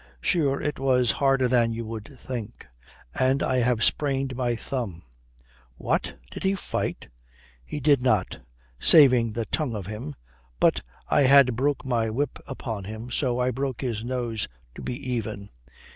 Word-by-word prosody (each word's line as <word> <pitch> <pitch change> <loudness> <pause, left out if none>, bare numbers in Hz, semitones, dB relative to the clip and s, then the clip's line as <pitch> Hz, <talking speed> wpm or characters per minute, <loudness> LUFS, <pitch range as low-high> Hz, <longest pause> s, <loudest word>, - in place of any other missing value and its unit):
Sure, 140 - +1
it 150 - -3
was 125 -3 +3
harder 135 -2 +2
than 120 -2 +3
you 115 0 -4
would 110 -1 -6
think. 120 -3 -7 0.5
And 130 +2 +2
I 130 - +1
have 120 -2 +2
sprained 135 -3 +1
my 120 -2 0
thumb." 115 -8 -4 0.7
"What, - - -1
did - - -7
he 195 +1 +1
fight?" 190 - -3 0.6
"He 150 - -5
did 145 -2 +4
not 110 -7 +1 0.4
saving 125 - +6
the 115 0 -2
tongue 135 -4 -2
of 100 -4 -5
him. 105 -7 -6 0.4
But - - +3 0.3
I - - +3
had 135 -2 +6
broke 140 +4 0
my 115 -3 0
whip 130 +5 -2
upon 115 -7 -5
him, 110 +4 -7
so 125 -2 0
I 125 0 +1
broke 130 0 -3
his 115 -5 -2
nose 120 -3 -2 0.3
to - - -10
be 125 - -4 0.2
even. 105 -4 -4
125 Hz, 160 wpm, -26 LUFS, 115-135 Hz, 0.7 s, saving